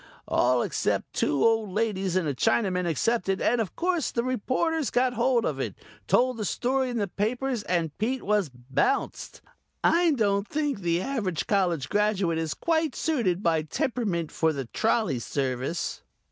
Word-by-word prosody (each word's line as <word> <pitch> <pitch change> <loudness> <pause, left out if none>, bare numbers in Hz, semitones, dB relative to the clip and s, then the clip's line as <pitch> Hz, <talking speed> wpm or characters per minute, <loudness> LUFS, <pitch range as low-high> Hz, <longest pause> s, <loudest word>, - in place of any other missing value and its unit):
All 125 -1 +2
except - - -1
two 140 -2 +1
old 225 -2 +2
ladies 195 -3 -1
and 185 -4 +1
a 145 - 0
Chinaman 180 - +1
accepted 195 - 0
and 240 0 +2
of 200 - -4
course 350 -3 0
the 235 - -1
reporters 255 +5 0
got 250 0 +2
hold 240 0 +2
of - - -2
it, - - -3 0.3
told 255 0 +3
the 215 - -3
story 255 - 0
in 240 - -3
the 205 -2 0
papers 240 +5 -1
and 170 -6 -1
Pete 250 +5 -1
was 205 -5 +1
bounced. 130 - -2 0.4
I 340 -1 +4
don't 200 -5 +1
think 290 -2 -1
the 175 -1 0
average 210 - -2
college 175 -9 +1
graduate 200 -5 +1
is 160 -2 -2
quite 320 -4 0
suited 215 - 0
by 165 -2 +2
temperament 170 - -2
for 160 -1 +1
the 140 -3 -4
trolley 215 - 0
service." 130 +5 -2
210 Hz, 160 wpm, -27 LUFS, 170-250 Hz, 0.4 s, I